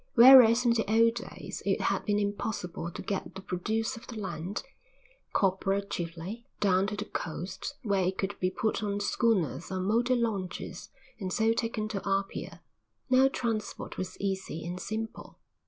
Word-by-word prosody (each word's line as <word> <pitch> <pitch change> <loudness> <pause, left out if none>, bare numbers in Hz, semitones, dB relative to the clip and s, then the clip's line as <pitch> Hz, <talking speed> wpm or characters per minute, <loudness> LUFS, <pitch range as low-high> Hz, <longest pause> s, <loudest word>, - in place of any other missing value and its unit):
Whereas 245 -1 +9
in 235 - +5
the 225 -2 0
old 230 +1 +5
days 235 - -7
it - - +1
had - - 0
been 205 -1 +2
impossible 200 -4 -2
to - - -7
get 195 -1 -3
the 190 - -6
produce 215 +5 -1
of 225 - -11
the 235 - -7
land, 185 0 -4 0.7
copra 195 +1 +1
chiefly, 180 +5 -5
down 195 -1 +3
to 210 - -3
the 210 0 -4
coast 180 - -5
where 200 -4 +2
it 185 +1 -1
could 195 +1 -1
be 185 - +2
put 215 +2 -1
on 205 -1 -1
schooners 205 -5 +1
or 190 - -1
motor 230 +7 +2
launches 210 -7 -3 0.3
and 190 -3 -3
so 225 +4 +3
taken 225 -2 -2
to 195 -3 -3
Apia, 195 0 -2 0.5
now 260 +1 +7
transport 230 -5 -3
was 185 0 -5
easy 190 -4 -3
and 175 +1 -4
simple. 220 +3 -5
205 Hz, 165 wpm, -29 LUFS, 185-225 Hz, 0.7 s, Whereas